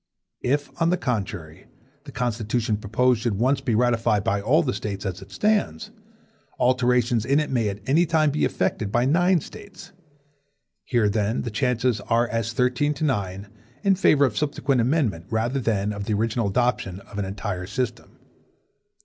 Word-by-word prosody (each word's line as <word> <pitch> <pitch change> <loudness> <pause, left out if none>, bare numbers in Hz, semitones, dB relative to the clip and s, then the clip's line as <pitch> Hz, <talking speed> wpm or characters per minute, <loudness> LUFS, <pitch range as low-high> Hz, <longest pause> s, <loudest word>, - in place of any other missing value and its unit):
If, 145 +3 0
on 165 - +4
the 180 - +2
contrary, 95 - -4 0.4
the - - -9
Constitution 115 -2 -1
proposed 115 +3 +1
should 115 -4 0
once 130 +5 +1
be 120 -4 0
ratified 115 -3 +2
by 100 -2 0
all 150 +11 +3
the 130 - -1
States 100 0 -5
as 95 -1 -4
it 95 - -12
stands, 210 - 0 0.7
alterations 125 -2 +2
in 140 +5 +2
it 150 - -2
may 115 -5 +1
at 100 +1 -6
any 165 +6 +3
time 155 -2 +2
be 150 - -1
effected 105 -2 -1
by 120 +2 +2
nine 175 +4 +3
States. 205 +4 -12 0.9
Here, 120 -4 +2
then, 105 +2 0
the 120 - -4
chances 125 -1 0
are 120 +1 +2
as 115 -1 -2
thirteen 125 +4 +1
to 150 - -5
nine(2) 100 -7 -2 0.3
in 195 - +4
favor 150 -6 +4
of 120 -6 -2
subsequent 140 -1 0
amendment, 115 - 0
rather 115 +4 0
than 105 -4 0
of 100 -1 -5
the 110 - -1
original 115 +1 0
adoption 100 -4 -1
of 105 - -9
an 100 - -1
entire 95 -2 -4
system. 120 +2 -4
120 Hz, 170 wpm, -24 LUFS, 105-135 Hz, 0.9 s, on